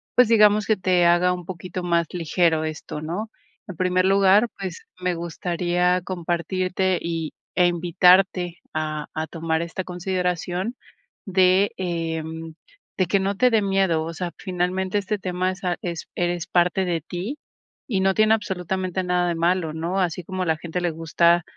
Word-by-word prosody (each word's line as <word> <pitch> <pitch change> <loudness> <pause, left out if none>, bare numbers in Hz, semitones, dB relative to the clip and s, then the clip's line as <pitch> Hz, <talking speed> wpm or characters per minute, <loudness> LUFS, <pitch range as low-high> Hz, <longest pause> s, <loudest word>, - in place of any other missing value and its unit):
pues, 250 -1 +6
digamos 210 -2 +5
que 220 0 +2
te 180 -1 +2
haga 175 +1 +4
un 180 -1 -6
poquito 180 0 -6
más 170 -1 +1
ligero 165 -1 +1
esto, 155 -1 -5
¿no? 180 +8 -4 0.4
En 185 - -7
primer 185 +1 +1
lugar, 195 +3 +5
pues, 185 -3 -6
me 180 -1 -1
gustaría 175 +1 0
compartirte, 185 +1 -1
y, 165 -2 -3 0.2
eh, 180 -1 +5
invitarte 175 +1 +3
a 155 -1 -3
a 160 0 -3
tomar 160 -1 -2
esta 170 +2 -4
consideración 180 +3 -2 0.5
de, 190 0 +3
eh, 165 -3 -2 0.7
de 185 - +3
que 195 +3 +2
no 195 +1 -1
te 250 +5 +3
dé 220 -2 +4
miedo. 195 -5 +1
O 165 +1 -5
sea, 175 +1 -4
finalmente 185 +1 -1
este 205 +1 -1
tema 185 0 -1
es 185 +1 -9 0.2
es 170 -2 -5
eres 175 0 -1
parte 180 +1 +2
de 170 -2 -1
ti 180 - -5 0.5
y 200 -5 +1
no 195 0 +3
tiene 215 0 +5
absolutamente 190 -3 -2
nada 180 0 +1
de 170 - -1
malo, 170 -1 +1
¿no? 170 +4 -2
Así 180 -1 -1
como 185 +2 -3
a - - -2
la 160 -1 +2
gente 170 +2 -4
le 175 -1 0
gusta, 170 +2 +2
180 Hz, 165 wpm, -23 LUFS, 170-190 Hz, 0.7 s, pues